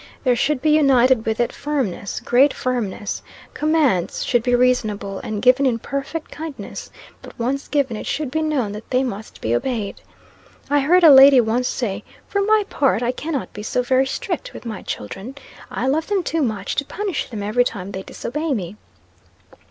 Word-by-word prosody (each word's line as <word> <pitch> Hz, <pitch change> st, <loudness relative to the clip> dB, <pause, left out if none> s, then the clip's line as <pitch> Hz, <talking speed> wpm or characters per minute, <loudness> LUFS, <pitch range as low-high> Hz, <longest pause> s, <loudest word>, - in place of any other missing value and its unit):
There 250 Hz, -3 st, +3 dB
should 275 Hz, +2 st, 0 dB
be 310 Hz, -, +3 dB
united 260 Hz, -6 st, +4 dB
with 220 Hz, +1 st, -1 dB
it 240 Hz, -, 0 dB
firmness 265 Hz, -10 st, -3 dB
great 265 Hz, +4 st, +3 dB
firmness. 225 Hz, -5 st, -3 dB, 0.3 s
Commands 300 Hz, -, +1 dB
should 240 Hz, -, +2 dB
be 245 Hz, +1 st, +2 dB
reasonable, 215 Hz, -6 st, 0 dB
and 210 Hz, 0 st, -5 dB
given 255 Hz, +2 st, +5 dB
in 240 Hz, -3 st, +1 dB
perfect 275 Hz, +6 st, -5 dB
kindness; 310 Hz, -2 st, -7 dB, 0.3 s
but -, -, -13 dB
once 265 Hz, +4 st, -2 dB
given, 275 Hz, -5 st, 0 dB
it -, -, -6 dB
should 295 Hz, -4 st, -2 dB
be 315 Hz, +2 st, 0 dB
known 290 Hz, -9 st, 0 dB
that 210 Hz, +2 st, -9 dB
they 255 Hz, +1 st, +2 dB
must 220 Hz, -4 st, -6 dB
be 110 Hz, -, 0 dB
obeyed. 210 Hz, -, -2 dB, 0.7 s
I 290 Hz, -, +4 dB
heard 345 Hz, +6 st, +4 dB
a 320 Hz, -, +10 dB
lady 270 Hz, 0 st, +9 dB
once 240 Hz, +2 st, +1 dB
say, 220 Hz, -6 st, -3 dB, 0.2 s
'For 400 Hz, -, 0 dB
my 425 Hz, +1 st, +3 dB
part, 270 Hz, -, +1 dB
I 240 Hz, -, +1 dB
cannot 285 Hz, +1 st, -4 dB
be 210 Hz, -, -7 dB
so 250 Hz, +4 st, -1 dB
very 260 Hz, +1 st, +2 dB
strict -, -, -4 dB
with -, -, -10 dB
my 220 Hz, -4 st, -5 dB
children. 195 Hz, -, -6 dB, 0.3 s
I 245 Hz, -, -3 dB
love 305 Hz, +5 st, 0 dB
them 400 Hz, -3 st, 0 dB
too 325 Hz, -1 st, -1 dB
much 215 Hz, -7 st, -2 dB
to 280 Hz, -, +2 dB
punish 395 Hz, -1 st, -3 dB
them 215 Hz, -4 st, -5 dB
every 215 Hz, +4 st, +2 dB
time 200 Hz, -5 st, -5 dB
they 190 Hz, -, -5 dB
disobey 300 Hz, +9 st, -3 dB
me.' 190 Hz, -1 st, -5 dB
255 Hz, 185 wpm, -21 LUFS, 220-290 Hz, 0.7 s, a